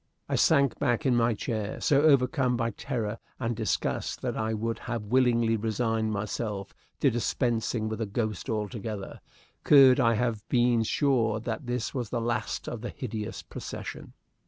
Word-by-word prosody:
I - - -3
sank 140 -6 +3
back 120 +1 +1
in 130 -2 +3
my 115 -1 +2
chair, 110 -2 -3
so 140 -1 +3
overcome 130 -4 +3
by 115 -1 0
terror 115 -2 -3 0.2
and 115 -1 -1
disgust - - -2
that - - -1
I 110 0 -1
would 115 +1 -2
have 115 -2 -2
very 105 - -12
willingly 120 -3 +3
resigned 110 0 0
myself 105 0 -3 0.3
to 140 - +4
dispensing 115 -1 0
with 110 +1 -4
a 110 - -1
ghost 110 -1 -3
altogether, 105 -2 -4 0.4
could 135 -3 +7
I 115 0 +4
have 115 -1 0
been 120 -2 +3
sure 115 -3 +1
that 120 +3 -4
this 120 -1 -2
was 125 -5 -3
the 120 - -1
last 120 +1 -2
of 120 - -5
the 120 - -4
hideous 110 -4 -5
procession. - - -7
115 Hz, 165 wpm, -28 LUFS, 110-125 Hz, 0.4 s, could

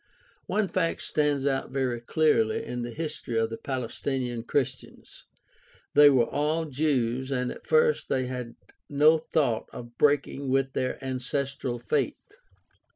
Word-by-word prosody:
— - - -33
One 210 -1 +1
fact 180 -3 -1
stands 145 -2 0
out 135 -1 0
very 130 -3 -1
clearly 220 - +2
in 125 0 -4
the 120 - -4
history 150 -4 -4
of 115 0 +1
the 115 - -4
Palestinian 125 -1 -3
Christians. 130 -1 -4 0.7
They 145 0 +8
were 130 -4 +4
all 155 +5 0
Jews 130 -4 0
and 125 -2 -1
at - - -11
first 470 0 +3
they 130 -1 +1
had 125 -2 -5 0.3
no 150 +3 +5
thought 145 -7 0
of 120 -1 -10
breaking 140 -1 +2
with 135 0 +1
their 130 - -1
ancestral 130 0 -2
faith. 120 - -2
135 Hz, 145 wpm, -27 LUFS, 125-150 Hz, 0.7 s, They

